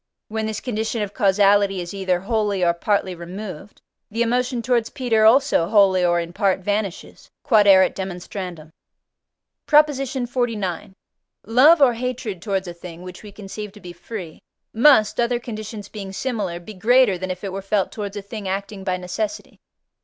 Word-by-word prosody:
When 220 0 -2
this 215 -1 -3
condition 225 -2 -2
of 205 -1 -6
causality 200 -2 +3
is 175 +1 -6
either 185 -2 -1
wholly 205 -2 0
or 170 - +3
partly 190 +1 0
removed, 185 +2 -9 0.3
the 230 +3 0
emotion 245 +1 -1
towards 235 -2 +1
Peter 225 -4 +1
also 250 -7 +4
wholly 195 -3 +4
or 175 -1 +3
in 170 0 -5
part 195 -1 +1
vanishes. 205 -1 -4 0.2
Q.E.D. 215 -6 +5 2.0
PROP. 300 0 +6
XLIX. 245 - -3 0.5
Love 275 - +6
or 250 -3 +5
hatred 235 -6 -4
towards 195 -2 -2
a 175 - -6
thing, 170 0 -11
which 180 0 -10
we 210 - -11
conceive 205 +1 -8
to 210 - -14
be 175 -3 -10
free, 175 -2 -8 0.3
must, 225 -3 +4
other 240 0 +1
conditions 215 -3 -7
being 200 -3 -8
similar, 200 -6 -3
be 195 +5 -10
greater 220 0 +3
than 185 +1 -4
if 185 +1 -5
it 195 -2 -4
were 195 - -4
felt 195 0 0
towards 205 -1 -6
a 205 - -6
thing 205 0 -7
acting 195 +1 -4
by 185 -1 -1
necessity. 180 +4 -5
205 Hz, 160 wpm, -22 LUFS, 190-230 Hz, 2.0 s, PROP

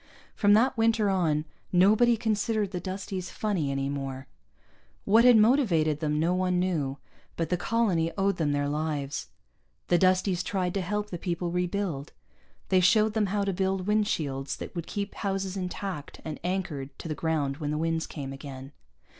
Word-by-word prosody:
From 205 -1 +4
that 235 +5 +4
winter 225 -2 +3
on, 160 -5 +1 0.3
nobody 215 +6 +5
considered 215 -1 0
the 180 - -3
Dusties 185 0 -5
funny 195 -10 -1
any 135 0 -1
more. 135 -1 -4 0.8
What 225 +4 +5
had 245 -2 +8
motivated 205 - +3
them 150 -1 0
no 170 +3 +2
one 180 0 +1
knew, 155 -7 -1 0.4
but 165 - -1
the 180 - +2
colony 180 -5 +1
owed 195 0 +1
them 150 -3 +1
their 145 0 0
lives. 145 -1 -2 0.6
The 175 - +4
Dusties 185 0 +3
tried 185 -3 -1
to 195 - -1
help 210 +3 -3
the 175 - -4
people 175 0 -2
rebuild. 180 -4 -2 0.6
They 185 - +5
showed 210 +4 +4
them 215 -2 +1
how 200 +1 0
to 195 -1 -1
build 190 0 -1
windshields 155 -10 0
that - - -8
would 170 -1 -4
keep 200 0 -4
houses 195 -1 -2
intact 180 -4 -5
and 155 -1 -5
anchored 155 -7 -3
to - - -7
the 155 - -2
ground 150 -4 -1
when 145 -1 -3
the 150 - -1
winds 165 0 -1
came 135 -3 -6
again. 135 -1 -9
180 Hz, 170 wpm, -28 LUFS, 150-200 Hz, 0.8 s, had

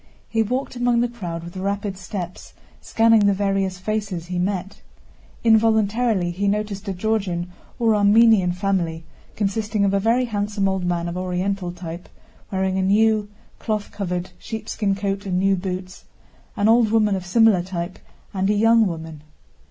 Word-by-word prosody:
He 225 - 0
walked 250 +5 -2
among 245 -1 +2
the 240 - +2
crowd 175 -9 -6
with 170 +1 -10
rapid 200 +1 -2
steps, 180 -1 -7 0.3
scanning 225 -2 +4
the 200 - +3
various 195 -2 0
faces 200 -3 -3
he 180 0 -3
met. 190 +1 -3 0.6
Involuntarily 220 -3 +3
he 200 +4 -2
noticed 205 0 -2
a 195 - -1
Georgian 185 -3 -1 0.3
or 230 -3 +3
Armenian 205 -2 +5
family 175 -3 -1 0.3
consisting 210 0 0
of 195 - +1
a 200 - +3
very 230 +5 +2
handsome 205 -3 -1
old 190 -1 -1
man 175 -1 -1
of 170 +1 -4
Oriental 185 0 -2
type, 175 0 -8 0.4
wearing 190 0 0
a - - +1
new, 210 +2 +3 0.3
cloth 215 -2 -3
covered, 180 -2 -4
sheepskin 215 -2 -3
coat 200 0 -3
and 180 -1 0
new 195 +1 +3
boots, 185 0 -6 0.5
an 205 - +2
old 230 0 +5
woman 215 -2 +3
of 190 - -4
similar 210 0 +4
type, 175 0 -5 0.3
and 195 0 0
a 210 - +3
young 225 +1 +4
woman. 160 -3 -6
195 Hz, 160 wpm, -22 LUFS, 180-220 Hz, 0.6 s, Armenian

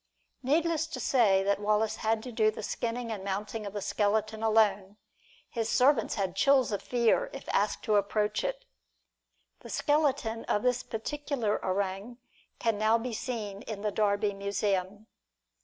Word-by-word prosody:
Needless 320 +4 +1
to 270 - -6
say 215 -6 +3
that 200 0 +1
Wallace 215 +1 +1
had 220 0 0
to 250 - -7
do 220 -1 +3
the 215 - -6
skinning 235 0 -3
and 210 -3 -4
the - - -9
mounting 205 +2 -3
of 200 - -7
the 205 -2 -4
skeleton 215 +1 0
alone. 210 -3 +2 0.5
His 230 -2 -3
servants 270 +5 +3
had 195 -4 -2
chills 275 -4 +4
of 205 - -2
fear 245 - +1
if - - -9
asked - - 0
to 215 -3 +3
approach 210 +1 0
it. - - -3 0.9
The - - -12
skeleton 275 -7 +1
of 210 - 0
this 250 -1 +2
particular 245 -1 -3
orang 195 +4 -2 0.4
can 225 -3 0
now 220 +1 +4
be 235 +1 -4
seen 215 -4 -4
in 215 -3 -7
the 210 - 0
Derby 205 0 +1
Museum. 200 0 -2
220 Hz, 160 wpm, -29 LUFS, 205-245 Hz, 0.9 s, chills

